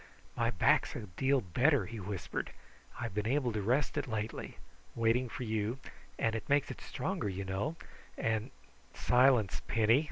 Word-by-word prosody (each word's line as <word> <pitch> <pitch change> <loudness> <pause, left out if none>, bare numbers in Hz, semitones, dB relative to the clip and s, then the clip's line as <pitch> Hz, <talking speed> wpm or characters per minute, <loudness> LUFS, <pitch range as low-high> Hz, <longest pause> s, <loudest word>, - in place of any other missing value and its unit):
"My 115 -1 +1
back's 100 -7 +3
a - - -4
deal 130 +8 +1
better," 125 - +3
he 115 +3 -7
whispered. 100 -2 -4 0.5
"I've 115 -4 -3
been 105 +1 -1
able 130 -1 +1
to 105 - -1
rest 130 +9 +1
it 145 - -4
lately 110 -1 -4 0.4
waiting 115 +2 +2
for 125 - -5
you, 110 +1 -1 0.4
and 115 - +1
it 115 - -4
makes 145 0 +3
it - - -9
stronger, - - -2
you 95 +1 -4
know, 95 - -2 0.4
and 110 +2 0 0.3
" - - -30 0.2
"Silence, 125 - +5
Penny!" 115 +3 +4
115 Hz, 165 wpm, -33 LUFS, 105-125 Hz, 0.5 s, Silence